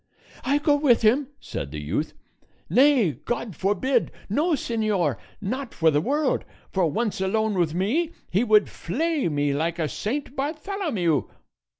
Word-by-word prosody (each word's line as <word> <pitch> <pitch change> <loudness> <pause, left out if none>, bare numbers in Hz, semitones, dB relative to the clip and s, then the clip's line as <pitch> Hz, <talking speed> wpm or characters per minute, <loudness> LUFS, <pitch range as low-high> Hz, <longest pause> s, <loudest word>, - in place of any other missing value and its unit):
"I 280 +2 +2
go 290 0 +3
with 265 -6 +3
him!" 255 +6 +4
said 70 - -5
the 75 +1 -6
youth. 90 - -2 0.6
"Nay, 260 - +5
God 235 -5 -3
forbid! 210 - +1 0.2
no, 315 - +2
señor, 215 - 0 0.2
not 245 +5 -4
for 160 -1 +4
the 145 0 +2
world; 285 - 0 0.3
for 185 -3 +2
once 215 +4 -1
alone 220 +3 +1
with 170 -4 0
me, 275 - +1 0.2
he 195 +6 +3
would 215 -3 +5
flay 300 - -1
me 145 -1 0
like 165 +4 -1
a 160 -2 0
Saint 270 - -3
Bartholomew." 295 - -1
220 Hz, 150 wpm, -25 LUFS, 170-280 Hz, 0.6 s, Nay